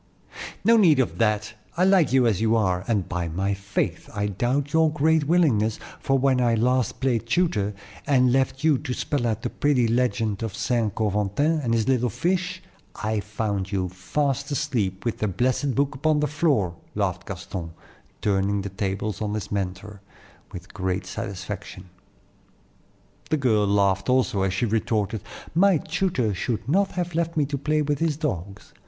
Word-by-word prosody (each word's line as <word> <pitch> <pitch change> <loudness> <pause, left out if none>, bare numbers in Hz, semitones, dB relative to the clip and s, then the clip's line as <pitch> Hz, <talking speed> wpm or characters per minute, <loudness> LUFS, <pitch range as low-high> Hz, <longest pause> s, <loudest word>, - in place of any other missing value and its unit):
"No 230 +1 +6
need 170 -9 +5
of 130 - 0
that; 105 -1 +1 0.2
I 180 - +3
like 190 -5 +4
you 130 -1 +4
as 110 -4 +1
you 115 0 +3
are, 95 -5 +1
and 105 -6 0
by 90 -1 -2
my 95 +5 -1
faith, 100 +1 -3
I 105 0 0
doubt 125 +8 -1
your 160 -1 +4
great 155 +1 +2
willingness, 135 -10 +2 0.2
for 135 - +1
when 130 -1 +2
I 120 -2 +3
last 125 +2 +1
played 120 -4 0
tutor 110 - +1 0.3
and 125 -3 +4
left 135 +1 0
you 155 -4 +4
to 125 - -4
spell 135 -5 -1
out 115 -1 -2
the 120 - -2
pretty 135 -5 +2
legend 115 -3 0
of 110 -4 -4
St. 115 -2 0
Coventin 105 +9 +1
and 120 -5 0
his 110 -2 0
little 125 -2 +2
fish, 180 - -1 0.3
I 110 0 -1
found 105 -2 -3
you 95 -2 -1
fast 135 - -2
asleep 125 -11 -1
with 115 - -2
the 105 - 0
blessed 125 +6 0
book 140 0 +1
upon 150 +3 +1
the 150 - +2
floor," 135 - +1 0.2
laughed 95 -4 -2
Gaston, 90 -2 -6 0.5
turning 100 0 +1
the 100 - -4
tables 95 +1 -3
on 105 0 -2
his 105 - -5
mentor, 100 +1 -4 0.5
with 90 +1 -10
great 95 -1 -2
satisfaction. 95 -1 -6 1.4
The 155 - +2
girl 110 -7 +2
laughed 100 +1 +2
also 125 -6 +2
as 95 -1 0
she 110 - +1
retorted, 110 -2 -1 0.3
"My 185 +2 +5
tutor 135 - -1
should 110 +3 -3
not 195 +7 +2
have 175 -1 -3
left 165 0 -1
me 150 - +3
to 140 +1 -3
play 150 +2 +1
with 145 -1 -1
his 160 -3 0
dogs. 100 - -4
115 Hz, 170 wpm, -24 LUFS, 100-145 Hz, 1.4 s, No